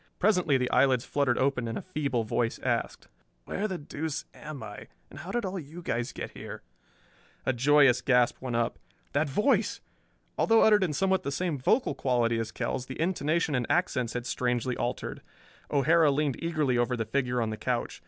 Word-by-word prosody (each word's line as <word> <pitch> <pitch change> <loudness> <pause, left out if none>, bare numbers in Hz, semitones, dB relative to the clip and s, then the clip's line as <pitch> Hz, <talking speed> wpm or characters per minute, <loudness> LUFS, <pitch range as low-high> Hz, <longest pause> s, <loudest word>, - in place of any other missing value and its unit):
Presently 180 -8 +3
the 125 -1 -1
eyelids 130 -3 +3
fluttered 140 -4 +1
open 130 -3 +1
and 115 - -3
a - - -4
feeble 145 -9 -1
voice 115 +1 -1
asked, - - -2 0.4
"Where 210 - -2
the 190 -3 -3
deuce 150 0 -4
am 150 -5 -8
I, 105 -1 -9 0.2
and 140 - -10
how 175 +4 -8
did 240 +1 -1
all 190 0 -3
you 165 +3 -10
guys 120 -1 -2
get - - -6
here?" - - -9 0.8
A 130 - +2
joyous 135 0 +5
gasp 125 -2 +2
went 125 -2 -3
up. 115 0 0 0.3
That 145 +1 +1
voice! 210 - +1 0.6
Although 225 0 +5
uttered 210 -2 +5
in 165 -5 0
somewhat 190 +4 +2
the 140 - -3
same 155 0 -1
vocal 225 - +2
quality 120 -3 +1
as 115 0 -3
Kell's 130 +2 -3
the 130 - -7
intonation 165 -2 0
and 125 -2 0
accents 130 -10 +1
had 125 -1 -4
strangely 125 0 -1
altered. 120 +1 -3 0.5
O'Hara 155 +3 +4
leaned 140 0 0
eagerly 150 -7 +1
over 120 +1 +1
the 110 - -1
figure 125 +1 0
on 115 -2 0
the - - -3
couch. 120 +2 -2
140 Hz, 185 wpm, -28 LUFS, 125-165 Hz, 0.8 s, joyous